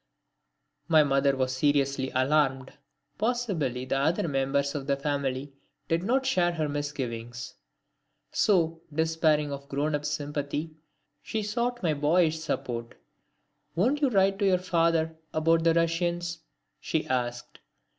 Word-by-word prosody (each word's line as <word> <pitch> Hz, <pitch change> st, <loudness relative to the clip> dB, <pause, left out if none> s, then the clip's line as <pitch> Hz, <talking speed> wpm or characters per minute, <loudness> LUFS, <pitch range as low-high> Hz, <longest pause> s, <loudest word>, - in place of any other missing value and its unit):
My 160 Hz, -2 st, +6 dB
mother 140 Hz, -1 st, +2 dB
was 130 Hz, 0 st, 0 dB
seriously 140 Hz, -1 st, +1 dB
alarmed. 135 Hz, -1 st, +1 dB, 0.5 s
Possibly 200 Hz, -, -1 dB
the 135 Hz, +1 st, 0 dB
other 160 Hz, +4 st, +1 dB
members 140 Hz, 0 st, 0 dB
of 140 Hz, -2 st, -5 dB
the 140 Hz, -1 st, +1 dB
family 140 Hz, -1 st, -2 dB, 0.3 s
did 165 Hz, +1 st, +1 dB
not 260 Hz, +7 st, +1 dB
share 180 Hz, -9 st, +2 dB
her 155 Hz, -2 st, -1 dB
misgivings; 125 Hz, -5 st, -4 dB, 0.8 s
so, 165 Hz, -5 st, +2 dB
despairing 160 Hz, -1 st, +1 dB
of 140 Hz, 0 st, -7 dB
grown 145 Hz, +2 st, -1 dB
up 150 Hz, 0 st, -1 dB
sympathy, 150 Hz, +1 st, -3 dB, 0.5 s
she 220 Hz, -1 st, -3 dB
sought 240 Hz, +3 st, -2 dB
my 160 Hz, -3 st, +2 dB
boyish 160 Hz, +2 st, +2 dB
support. 120 Hz, -6 st, -4 dB, 0.8 s
"Won't 255 Hz, -, +2 dB
you 280 Hz, -, +4 dB
write 195 Hz, -3 st, +2 dB
to 205 Hz, -, +2 dB
your 185 Hz, -1 st, +4 dB
father 165 Hz, -3 st, +1 dB, 0.2 s
about 165 Hz, +1 st, +3 dB
the 165 Hz, 0 st, +4 dB
Russians?" 170 Hz, +1 st, 0 dB, 0.4 s
she 160 Hz, -, -1 dB
asked. 120 Hz, -1 st, -3 dB
155 Hz, 130 wpm, -28 LUFS, 140-170 Hz, 0.8 s, My